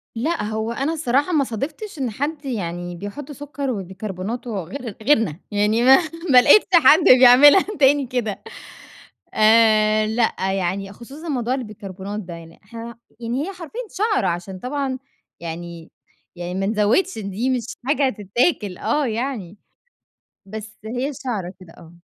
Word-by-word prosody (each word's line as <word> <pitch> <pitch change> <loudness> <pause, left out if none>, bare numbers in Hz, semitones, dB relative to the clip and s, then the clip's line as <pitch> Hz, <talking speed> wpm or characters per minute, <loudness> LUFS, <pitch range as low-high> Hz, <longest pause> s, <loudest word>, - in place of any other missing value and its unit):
لأ، 310 +7 -1
هو 220 +2 -3
أنا 275 +6 -2
الصراحة 290 +1 0
ما 290 - +3
صادفتش 295 - -6
إن 250 -4 -2
حد 285 +5 -4
يعني 175 -7 -4
بيحُطّ 205 - -8
سُكر 285 -1 -5
وبيْكرْبْوناتو 200 +3 -5
غير 235 - -7
غيرنا، 220 - +2
يعني 210 +3 +1
ما 265 +1 +8 0.3
ما 250 -2 +8
لقيتش 410 +12 +6
حد 320 0 +7 0.2
بيعملها 270 +8 +8 0.2
تاني 280 -1 +4
كده 235 -5 -3 0.9
آآ 215 -1 +4
لأ، 225 +1 0 0.2
يعني 195 +1 -2
خصوصًا 275 +10 -11
موضوع 250 -3 -1
البيكربونات 205 -4 -6
ده، 180 -3 -9
يعني 165 0 -12
إحنا 230 +3 -9 0.2
يعني 240 +4 -2
هي 395 - -6
حرفيًا 365 +6 -7
شَعْرَة 410 0 0
عشان 180 +2 -4
طبعًا 265 +2 -3 0.4
يعني 170 0 -8 0.4
يعني 175 +1 -5
ما 195 - -1
نزوِّدش 220 - +1
دي 205 +5 -3
مش 250 -4 -1 0.2
حاجة 275 0 +2
تِتّاكِل 205 - 0
آه، 295 -2 0
يعني 225 -5 -4 0.9
بس 220 +2 -9
هي 250 +6 -3
شَعْرَة 210 -9 -5
كده 180 -3 -15
آه. 165 0 -15
230 Hz, 140 wpm, -21 LUFS, 195-275 Hz, 0.9 s, ما